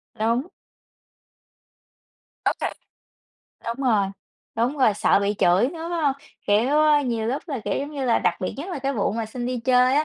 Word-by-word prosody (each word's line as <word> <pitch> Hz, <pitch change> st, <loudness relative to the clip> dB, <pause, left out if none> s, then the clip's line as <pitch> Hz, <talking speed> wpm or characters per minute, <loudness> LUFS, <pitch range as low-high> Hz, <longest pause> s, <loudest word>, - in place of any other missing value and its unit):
Đúng. 235 Hz, +7 st, 0 dB, 2.0 s
Okay, -, -, 0 dB, 0.9 s
đúng 245 Hz, +3 st, -3 dB
rồi, 210 Hz, -5 st, +3 dB, 0.5 s
đúng 245 Hz, +6 st, 0 dB
rồi, 235 Hz, -6 st, +4 dB
sợ 195 Hz, -, +3 dB
bị 200 Hz, +1 st, 0 dB
chửi 180 Hz, +8 st, +4 dB
nữa, 330 Hz, +1 st, -6 dB
phải 340 Hz, -1 st, -1 dB
hông? 280 Hz, -2 st, +3 dB, 0.3 s
Kiểu, 210 Hz, +5 st, +3 dB
ờ, 305 Hz, -1 st, +5 dB
nhiều 230 Hz, -4 st, -1 dB
lúc 260 Hz, +5 st, -1 dB
là, 275 Hz, -6 st, -3 dB
kiểu, -, -, -1 dB
giống 285 Hz, +2 st, -4 dB
như 280 Hz, -3 st, -4 dB
là, 240 Hz, -2 st, +3 dB
đặc 180 Hz, -, +1 dB
biệt 185 Hz, -, -3 dB
nhất 295 Hz, +7 st, -6 dB
là 345 Hz, -, -3 dB
cái 275 Hz, +1 st, -1 dB
vụ 205 Hz, -5 st, 0 dB
mà 225 Hz, 0 st, -2 dB
xin 240 Hz, +2 st, -5 dB
đi 250 Hz, -2 st, -2 dB
chơi 255 Hz, 0 st, +4 dB
á, 300 Hz, +2 st, +3 dB
250 Hz, 190 wpm, -24 LUFS, 220-280 Hz, 2.0 s, ờ